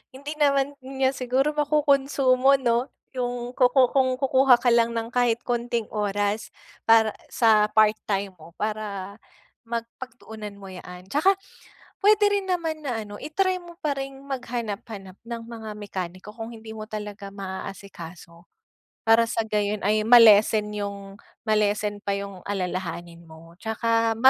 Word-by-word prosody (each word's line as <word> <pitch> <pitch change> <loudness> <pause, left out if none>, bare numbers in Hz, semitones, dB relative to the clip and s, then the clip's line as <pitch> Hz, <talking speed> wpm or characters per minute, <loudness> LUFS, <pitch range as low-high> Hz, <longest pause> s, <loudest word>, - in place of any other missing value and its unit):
hindi 285 +3 -7
naman 280 -1 +3
niya 265 0 0
siguro 260 +2 0
makunsumo 275 -3 +3
'no, 245 0 +1 0.2
'yung 245 -1 -3
kuku 255 0 +4
kung 260 -2 +2
kukuha 265 -1 +5
ka 245 - +4
lang 235 0 +3
ng 230 +1 -3
kahit 240 -1 +1
konting 235 -2 -2
oras 205 0 -1 0.3
para 225 -1 +6 0.2
sa 215 -2 +4
part-time 210 -2 +1
mo 165 +1 -15
para 205 -1 -4 0.5
mag 230 0 -2 0.2
pagtuunan 220 -5 -9
mo 195 -1 -11
yaan 180 0 -10
tsaka 375 +7 +4 0.7
puwede 420 0 +6
rin 400 -1 0
naman 325 -3 -1
na 235 -4 -2
ano 205 0 -9
i-try 370 +5 0
mo 345 -1 -13
pa 290 -2 0
ring 270 0 -5
maghanap-hanap 225 -7 -5
ng 230 -1 -5
mga 225 -2 -8
mekaniko 190 -1 -6
kung 225 0 -7
hindi 220 0 -10
mo 215 0 -6
talaga 210 -2 -6
maaaasikaso. 185 -3 -8 0.6
Para 225 +1 +6
sa 225 - 0
gayon 210 -1 -1
ay 215 +1 +2
ma-lessen 215 -2 +7
'yong 200 -1 -6 0.3
ma-lessen 210 -1 +1
pa 200 - -1
'yong 200 -1 -7
alalahanin 175 -3 -4
mo, 165 +1 -15
'tsaka 225 0 +1
225 Hz, 140 wpm, -25 LUFS, 205-260 Hz, 0.7 s, ma-lessen